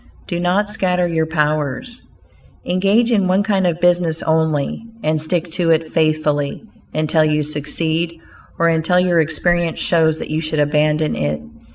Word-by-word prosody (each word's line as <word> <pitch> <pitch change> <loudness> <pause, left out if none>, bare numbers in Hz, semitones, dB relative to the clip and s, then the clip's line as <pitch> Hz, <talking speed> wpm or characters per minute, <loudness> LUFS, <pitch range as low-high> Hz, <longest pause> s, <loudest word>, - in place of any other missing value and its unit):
DO 175 - -3
NOT 180 +4 +1
SCATTER 180 -4 0
YOUR 160 -2 0
POWERS 155 - -2 0.6
Engage 200 +6 +2
in 200 -5 +2
one 190 +2 +2
kind 195 -3 +1
of 170 -1 -1
business 175 -2 +2
only, 160 +2 0 0.2
and 155 0 0
stick 170 +1 -2
to 170 0 0
it 160 0 +2
faithfully 155 -2 0 0.3
until 155 +1 +1
you 150 -1 +1
succeed, 160 +3 -2 0.4
or 170 - +2
until 165 +2 +2
your 175 -2 +3
experience 170 +2 0
shows 160 -2 +2
that - - -7
you 155 +1 -1
should 155 -1 -3
abandon 150 - +1
it. 75 0 -2
160 Hz, 155 wpm, -18 LUFS, 155-175 Hz, 0.6 s, your